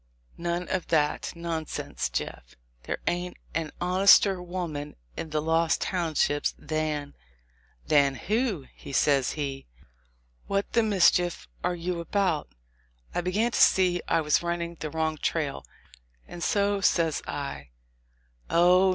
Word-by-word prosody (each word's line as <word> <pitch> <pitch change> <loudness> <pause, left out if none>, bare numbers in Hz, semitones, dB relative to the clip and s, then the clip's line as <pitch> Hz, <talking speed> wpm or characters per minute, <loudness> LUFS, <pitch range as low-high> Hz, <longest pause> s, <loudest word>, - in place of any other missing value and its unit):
None 175 +1 -2
of 185 -2 -1
that 150 -2 +1
nonsense, 165 - -3
Jeff; - - -5 0.3
there - - -2
ain't 175 +1 -2 0.2
an 160 -2 -2
honester 190 +1 +5
women 175 -5 -5 0.2
in 160 - -5
the 155 0 -1
Lost 165 +1 +2
Townships 160 -5 0
than" 150 -1 -2 0.4
— - - -36
"Than 140 -2 +5
who?" 210 - -1 0.3
says 135 -2 +3
he; 140 -3 -4 0.8
"what 200 0 -1
the 230 - +4
mischief 180 -4 +3 0.2
are 180 0 0
you 175 0 -3
about?" 170 -2 0 0.6
I - - 0
began 205 +7 +1
to - - +1
see 180 -2 +4
I 165 - +2
was 150 -1 +2
running 170 0 -2
the 155 - -4
wrong 160 0 -1
trail, 70 - -2 0.6
and 175 - -9
so 200 +2 +1
says 165 -5 +2
I, 70 -1 -5 0.8
"Oh! 180 +2 +5
170 Hz, 130 wpm, -27 LUFS, 150-180 Hz, 0.8 s, honester